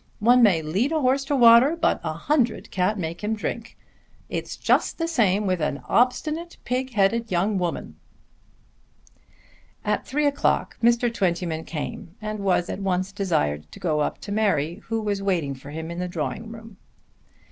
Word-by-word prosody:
One 245 +4 +5
man 180 -9 +4
may - - -7
lead 205 - 0
a 320 - +1
horse 270 0 +2
to 285 - 0
water 240 +4 +7
but - - +1
a - - -2
hundred 260 -6 0
can't 190 +3 0
make 170 +1 -5
him 220 +1 0
drink. 230 +2 -5 0.5
It's - - -4
just - - +1
the 330 - -1
same 210 - +2
with 185 -3 0
an 140 -3 -2
obstinate 305 +7 0
pig 255 +1 -2
headed 225 +3 +2
young 190 +2 +1
woman." 175 -2 -3 1.9
At - - -1
three 295 +3 0
o'clock 285 -1 +1
Mr. 235 0 +3
Twentyman 170 -5 -1
came 165 +2 -6
and 215 0 -4
was 185 -3 +1
at - - -4
once 190 -1 -1
desired 75 - -1
to - - -11
go 155 -4 0
up 150 - -1
to 200 - -7
Mary 185 -5 0
who 225 0 -2
was 205 -2 -2
waiting 175 -8 0
for 135 +1 -11
him 160 +2 -6
in 170 - -5
the 180 - -2
drawing 175 - -4
room. 225 -2 -11
Mrs. - - -37
200 Hz, 180 wpm, -24 LUFS, 175-235 Hz, 1.9 s, water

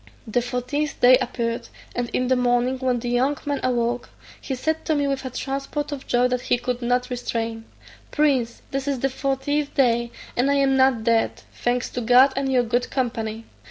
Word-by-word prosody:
The 240 +2 0
fortieth 255 +5 -2
day 250 +1 +8
appeared: 235 -2 -3 0.3
and 245 -1 -2
in 255 - 0
the 260 - +3
morning, 250 +1 +1
when 255 -1 +1
the 240 0 -4
young 260 +4 +1
man 285 -1 -1
awoke, 245 -1 0 0.3
he 265 - -3
said 315 +5 -1
to 315 - +1
me 285 -1 +1
with 275 -1 -1
a - - -2
transport 275 +3 -4
of 280 -2 -6
joy 245 0 +3
that 250 0 -1
he 245 - +1
could 245 0 -3
not 250 +1 0
restrain, 230 -2 -3 0.4
"Prince, 265 -6 +1
this 275 +1 -3
is 275 -3 -1
the 270 - +1
fortieth 275 +2 -1
day, 235 -3 +2 0.3
and 255 +3 +2
I 280 - +3
am 275 -1 +3
not 260 -4 +3
dead, 230 0 +1
thanks 245 +1 -1
to 245 - -3
God 250 +4 +6
and 270 0 -1
your 250 -2 +3
good 240 +1 0
company. 225 -4 -2
250 Hz, 195 wpm, -23 LUFS, 240-275 Hz, 0.4 s, day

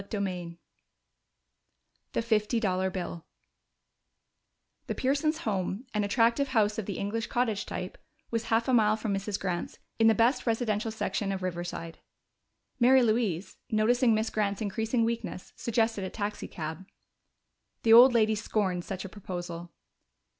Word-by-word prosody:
CHAPTER 200 0 -2
IX 175 -2 -6 1.6
The - - 0
Fifty 225 0 +1
Dollar 190 -3 0
Bill 175 -3 -5 1.6
The - - -2
Pearsons' 300 +5 0
home, 200 +2 -2
an 210 -1 +1
attractive 235 +6 +2
house 220 -4 +1
of 215 - -5
the 200 - -3
English 225 +3 -2
cottage 230 -5 -1
type, 180 0 -5 0.3
was 230 -1 -1
half 230 0 +1
a 260 - +2
mile 215 -2 +4
from 215 -2 -2
Mrs. 195 +1 -2
Grant's, 180 -2 -3 0.2
in 225 - +6
the 225 - +5
best 235 +5 +2
residential 225 -1 0
section 215 -2 -2
of 190 -1 -4
Riverside. 175 -2 -5 0.8
Mary 255 +1 +6
Louise, 215 -6 0
noticing 230 +2 +3
Miss 220 +1 -1
Grant's 200 -2 0
increasing 225 +3 0
weakness, 230 -5 -4
suggested 225 -3 0
a 190 - -3
taxicab. 190 -5 -5 1.0
The 225 - +6
old 245 +3 +10
lady 220 -2 +3
scorned 205 -4 -1
such 185 +1 -5
a - - -6
proposal. 175 -3 -6
215 Hz, 140 wpm, -29 LUFS, 190-230 Hz, 1.6 s, old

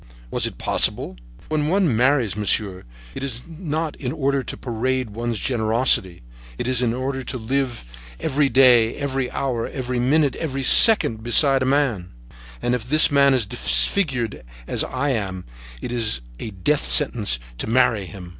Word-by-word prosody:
Was - - -1
it - - -10
possible? 60 - 0 0.3
When 155 -1 -1
one 175 - +1
marries, 125 - +1
monsieur, 100 -2 -1 0.3
it - - -7
is 125 -3 -6
not 160 -2 -4
in 125 -3 -4
order 140 -3 -1
to - - -7
parade 125 0 -3
one's 115 +1 -4
generosity; 110 - +1 0.3
it - - -4
is 130 -1 +1
in 120 -2 +1
order 130 +2 -4
to 130 - -5
live 125 +1 -3 0.4
every 145 -1 0
day, 120 -3 +4
every 135 -3 -3
hour, 125 -4 -3
every 125 -2 -4
minute, 140 +3 +1
every 135 -4 -4
second 130 - +5
beside 135 +3 +4
a - - 0
man; 125 -11 -1 0.5
and 120 - 0
if 125 -1 -4
this 155 +1 +5
man 140 -1 +4
is 120 -4 0
disfigured, 115 - 0 0.2
as - - -2
I 135 +3 -3
am, 95 -7 -3 0.4
it - - -5
is 115 - -1 0.2
a - - -5
death 110 +9 -1
sentence 115 - +2 0.2
to - - -3
marry 115 -4 +1
him! 90 0 -11
125 Hz, 165 wpm, -21 LUFS, 110-140 Hz, 0.5 s, second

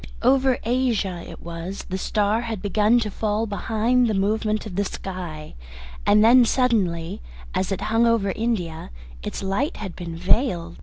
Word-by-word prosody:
Over 260 0 +4
Asia 225 -7 0
it - - -11
was 170 +3 -6
the 185 - -2
star 210 +3 +1
had 230 -3 -4
begun 210 +4 +3
to 210 -2 -3
fall 215 +2 -1
behind 225 +4 +1
the 215 - 0
movement 215 +2 0
of 200 -4 -7
the 200 - +1
sky, 180 -6 -6 0.5
and 210 +1 +6
then 245 +2 +7
suddenly, 205 - 0 0.3
as 190 +1 -1
it 195 - -2
hung 225 +3 +2
over 220 -4 +2
India, 185 -9 -2 0.3
its - - -5
light 195 +10 -1
had 195 -4 -6
been 170 -2 -6
veiled. 175 -2 0
210 Hz, 160 wpm, -23 LUFS, 185-230 Hz, 0.5 s, then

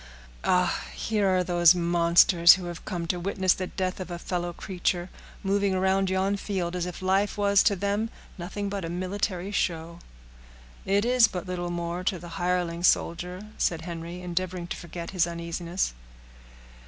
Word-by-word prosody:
Ah! 180 -1 +2
here 210 -3 0
are 185 -1 +3
those 175 -1 +5
monsters, 170 0 +6
who 185 -2 -3
have 175 -1 -7
come 175 -2 -3
to 175 +1 -1
witness 190 0 +2
the 185 - -4
death 185 0 -3
of 185 - -6
a 175 - -4
fellow 175 0 -3
creature, 175 0 -2 0.3
moving 200 0 +1
around 190 +1 +2
yon 190 +2 +1
field, 185 -4 -3
as 180 0 -2
if 180 +1 -7
life 195 +3 +1
was, 200 -1 +4
to 205 - +3
them, 200 +4 -1 0.3
nothing 200 +3 -4
but 200 -1 -3
a 165 - -4
military 185 +1 -2
show." 170 -3 -2 0.9
"It 200 +2 +2
is 245 -1 +5
but 180 -3 -5
little 180 -1 -3
more 175 +1 -3
to 190 -2 +1
the 175 +1 -10
hireling 175 -1 0
soldier," 180 +2 +1
said 165 -2 +1
Henry, 170 +1 -7
endeavoring 180 0 -3
to - - -3
forget 170 0 -7
his 180 -3 +2
uneasiness. 170 - -3
180 Hz, 165 wpm, -27 LUFS, 175-195 Hz, 0.9 s, monsters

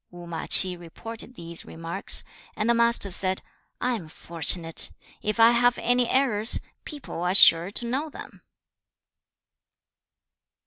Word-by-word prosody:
3. 175 - -16
Wu - - -11
ma 165 -1 -7
Ch'i 185 -1 +6
reported 225 +8 -11
these 170 -2 -6
remarks, 165 +4 -4 0.3
and 215 - -3
the 235 - +3
Master 235 -4 0
said, 185 +1 -2 0.4
'I 250 0 -1
am 180 -9 -7
fortunate! 165 0 0 0.3
If 215 +2 -4
I 225 +1 +6
have 240 +1 +1
any 245 0 0
errors, 240 -5 +2 0.3
people 290 - -9
are 180 +2 -1
sure 170 -2 +7
to 225 +4 0
know 270 +6 -4
them.' - - -13
205 Hz, 140 wpm, -24 LUFS, 170-235 Hz, 0.4 s, sure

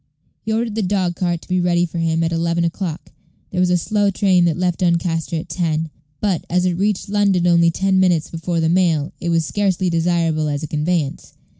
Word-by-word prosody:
He 220 - -4
ordered 225 0 -1
the 220 - -1
dog 185 -3 0
cart 175 -2 -2
to - - -18
be 185 0 0
got 175 - 0
ready 175 0 +2
for 170 0 -5
him 165 0 +1
at 165 - 0
eleven 170 +1 0
o'clock. 170 -1 -4 0.4
There - - -2
was 180 0 +3
a 180 - +3
slow 205 +3 +1
train 185 -3 +3
that 165 -2 +1
left 180 -1 -1
Doncaster 170 -2 0
at 160 - -4
ten; 160 -3 -2 0.3
but, 195 -6 0
as 180 +1 +1
it 180 - +1
reached 200 +2 -1
London 200 -3 +2
only 170 -1 +4
ten 190 +2 +1
minutes 175 -4 +2
before 165 +1 -2
the 160 - +1
mail, 165 -4 +1
it 170 - -3
was 165 -1 +1
scarcely 190 -1 0
desirable 165 -2 +1
as 145 0 -2
a - - -3
conveyance. 150 -1 -2
175 Hz, 215 wpm, -19 LUFS, 165-185 Hz, 0.4 s, only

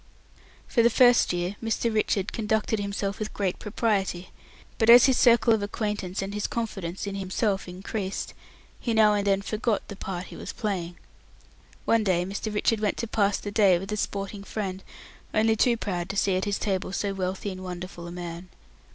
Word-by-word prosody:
For 235 - +3
the 235 - +5
first 245 0 +5
year 175 +3 -2
Mr. 225 0 0
Richard 210 -2 0
conducted 220 -1 0
himself 200 0 -3
with 215 0 -5
great 190 -3 -1
propriety, 200 -4 -1 0.5
but 225 -1 +3
as 240 0 +10
his 265 - +4
circle 235 -1 +5
of 220 - +1
acquaintance 205 -2 -3
and 195 +1 -5
his 210 0 -1
confidence 195 -6 -4
in 200 - -4
himself 195 +1 -1
increased, 190 +2 -4 0.5
he 230 -3 -1
now 215 -1 +6
and 205 -1 0
then 195 0 +2
forgot 215 0 -1
the 200 - -6
part 185 -2 -5
he - - -9
was - - -7
playing. 180 -6 -3 0.9
One 230 -1 +3
day 180 -3 +1
Mr. 200 +3 -4
Richard 210 +1 +1
went 210 -2 0
to - - -2
pass 205 -2 +1
the 205 - -6
day 200 -4 +5
with 195 +4 -6
a - - 0
sporting 200 0 -3
friend, 195 -2 -4 0.5
only 220 +1 +4
too 235 +2 +3
proud 180 -5 -3
to 195 - -3
see 195 -1 +2
at 185 - 0
his 205 -1 0
table 190 -3 -2
so 200 +1 -1
wealthy 190 +1 -3
and 185 0 -8
wonderful 180 -1 -7
a - - -7
man. 175 0 -7
200 Hz, 190 wpm, -26 LUFS, 185-220 Hz, 0.9 s, as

